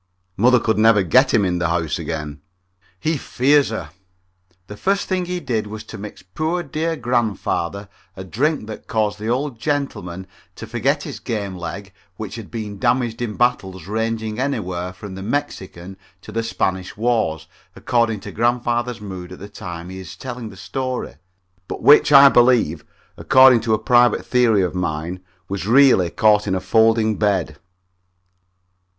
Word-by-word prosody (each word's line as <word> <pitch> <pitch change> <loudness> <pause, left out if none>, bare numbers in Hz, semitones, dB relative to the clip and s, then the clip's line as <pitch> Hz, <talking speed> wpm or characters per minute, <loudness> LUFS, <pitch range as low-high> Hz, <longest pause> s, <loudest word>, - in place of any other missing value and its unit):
Mother 125 +5 +4
could 110 -2 0
never 110 -2 +5
get 130 - +4
him 105 -4 +3
in 90 -1 -1
the 85 -1 0
house 85 -2 -1
again. 75 -2 -5 0.6
He 155 - 0
fears 140 +2 +2
her. 90 -10 -5 0.7
The 105 - -9
first 195 - 0
thing 185 -2 -1
he 180 0 -3
did 110 -9 -2
was 110 +1 -7
to 115 - -10
mix 105 -1 -9
poor 155 - -2
dear 160 +2 -2
grandfather 105 - -2 0.3
a 95 - -6
drink 135 - -1
that 110 0 -9
caused 105 -1 -1
the 110 - -5
old 130 0 -2
gentleman 110 - -3 0.3
to - - -8
forget 130 +6 -1
his - - -7
game 105 -5 -4
leg 95 +2 -7 0.2
which 110 -2 -6
had 110 -3 -8
been 105 -3 -6
damaged 120 -1 0
in 110 -3 -3
battles, 95 -7 -1
ranging 110 +1 -3
anywhere 95 -10 -2
from 95 +2 -10
the 95 - -7
Mexican 95 -7 -4 0.3
to - - -10
the 115 - -1
Spanish 95 -5 -2
wars, 110 -9 0 0.3
according 115 -4 0
to - - -8
grandfather's 120 0 -1
mood 95 -3 -8
at - - -9
the 100 - -10
time 90 -3 -8
he 95 0 -8
is 95 -5 -9
telling 125 -3 -7
the 95 - -13
story, 130 +4 -4 0.5
but - - -6
which 150 +1 +6
I 140 0 +9
believe, 120 - +3 0.3
according 130 -3 +6
to 110 -1 +1
a - - -2
private 120 +3 +3
theory 115 -6 +3
of 90 - -2
mine, 85 0 -3 0.3
was 100 0 -4
really 125 -8 +5
caught 105 +3 +3
in 95 - 0
a - - 0
folding 110 +1 +2
bed. 95 -8 0
110 Hz, 165 wpm, -20 LUFS, 95-125 Hz, 0.7 s, I